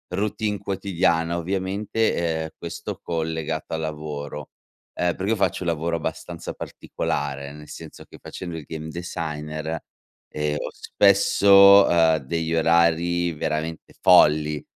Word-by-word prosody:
routine 105 +1 -1
quotidiana, 90 -4 0
ovviamente 95 +5 -1
ehm, 80 -2 -1
questo 85 - -6
collegato 80 -2 -3
al 80 - -2
lavoro. 75 -2 -6 0.5
Eh, 90 0 +1
perché 95 +3 -2
io 115 - +1
faccio 95 -1 0
un 85 - -1
lavoro 85 +1 -1
abbastanza 80 - -5
particolare, 70 0 -4
nel 75 0 -12
senso 80 +1 -10
che - - -15
facendo 85 -3 -7
il 80 - -8
game 80 -1 -6
designer, 80 -2 -5 0.5
ehm, 75 0 -2
ho - - -4
spesso, 100 0 +6
uhm, 80 -2 +4
degli 80 +4 -3
orari 85 +1 +2
veramente 80 +1 -4
folli, 75 -1 +5
80 Hz, 125 wpm, -23 LUFS, 75-90 Hz, 0.5 s, spesso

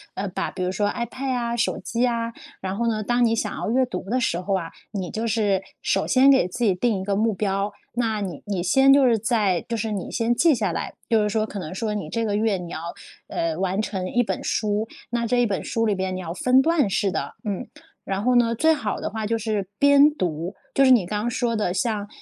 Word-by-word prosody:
呃， 200 - -2
把 185 - -3
比 185 - -4
如 180 - 0
说 205 +2 0
ipad 240 +5 -4
呀， 235 -2 -1
手 235 - 0
机 235 - -3
呀， 235 -2 0 0.3
然 190 0 -3
后 235 +1 0
呢， 215 -2 0
当 240 +3 +2
你 225 - +2
想 210 -2 -2
要 - - -3
阅 260 +2 +3
读 250 - -5
的 255 +3 +1
时 175 -8 0
候 195 +1 0
啊， 165 -3 -5 0.2
你 190 -4 -4
就 225 +1 -3
是 205 -4 +1 0.2
首 195 - +1
先 265 +1 +5
给 265 -9 +4
自 210 +7 -4
己 200 - +4
定 205 +1 0
一 - - -4
个 200 - 0
目 220 +2 +2
标， 195 +1 -1 0.2
那 225 -3 0
你 190 -4 -5
你 195 -4 -1
先 270 +9 +5
就 280 -2 +5
是 235 -2 +4
在 210 -5 +1
就 235 - -1
是 220 0 -2
你 195 - -4
先 230 0 +1
记 325 +5 +4
下 205 -5 -1
来， - - -4 0.2
就 225 -2 +4
是 210 - 0
说 215 0 0
可 205 -1 -6
能 160 -3 -6
说 215 +1 -2
你 210 - -4
这 230 -1 -1
个 205 -2 0
月， 215 -1 +1
你 175 -1 -7
要， - - -4 0.5
呃， 165 -1 -2
完 190 +2 0
成 190 -4 -3
1 245 - +2
本 - - -3
书， 215 0 0 0.2
那 235 0 0
这 245 +2 +1
1 - - +3
本 200 -4 -2
书 225 0 -1
里 210 - +2
边 190 0 -2
你 - - -4
要 165 - -4
分 255 +7 +3
段 315 -7 +2
式 195 0 +1
地 - - -3
嗯， 200 -4 -3 0.4
然 195 +1 -3
后 250 +2 +3
呢， 235 -1 +4
最 320 +6 +4
好 220 -9 -3
的 - - -3
话 220 0 -3
就 230 +1 0
是 210 -3 -2
边 285 +1 +7
读 175 - -3 0.2
就 275 - +4
是 - - +5
你 230 -8 +5
刚 210 +3 -2
刚 235 - -1
说 235 -1 -1
的 210 -4 0
像， 205 +1 -1
215 Hz, 275 characters per minute, -24 LUFS, 195-235 Hz, 0.5 s, 边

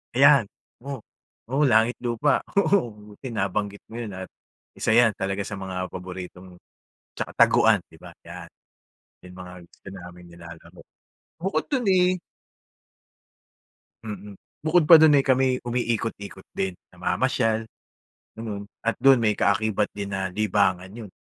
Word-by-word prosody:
Ayan. 140 -2 +6 0.4
Oo. 140 -3 -6 0.5
Oo, 135 +5 +1
langit-lupa. 120 +2 +2 0.2
Oo, 195 - +2 0.2
buti 125 +4 -9
nabanggit 100 0 -2
mo 115 - -12
yun 110 -4 -5
at 95 0 -7 0.5
isa - - -1
'yan 120 -2 +6
talaga 100 0 -2
sa 100 - -6
mga 90 -1 -4
paboritong 90 0 -9 0.6
tsaka - - -4
taguan, - - +5
'di - - -17
ba? - - -12 0.2
Yan. - - -9 0.8
Yung 90 0 -13
mga 90 0 -9
gusto 85 - -26
naming 90 -2 -11
nilalaro. 85 0 -13 0.6
Bukod 190 +3 -2
do'n, 255 -4 0
eh 185 -1 +4 1.9
Mm. 105 -2 -8 0.3
Bukod 165 +1 +4
pa 165 - +11
do'n 150 -2 +7
ay 135 - +2
kami'y 130 -1 +2
umiikot-ikot 115 -5 -3
din. 95 -1 -2 0.2
Namamasyal, 110 0 0 0.7
ganun, 105 -3 -6 0.2
at 115 - -1
do'n 135 -3 +6
may 105 -2 +2
kaakibat 105 0 +1
din 100 -1 -5
na 95 -1 -2
libangan 95 -3 +1
'yon. 110 -1 -10
105 Hz, 135 wpm, -24 LUFS, 95-125 Hz, 1.9 s, pa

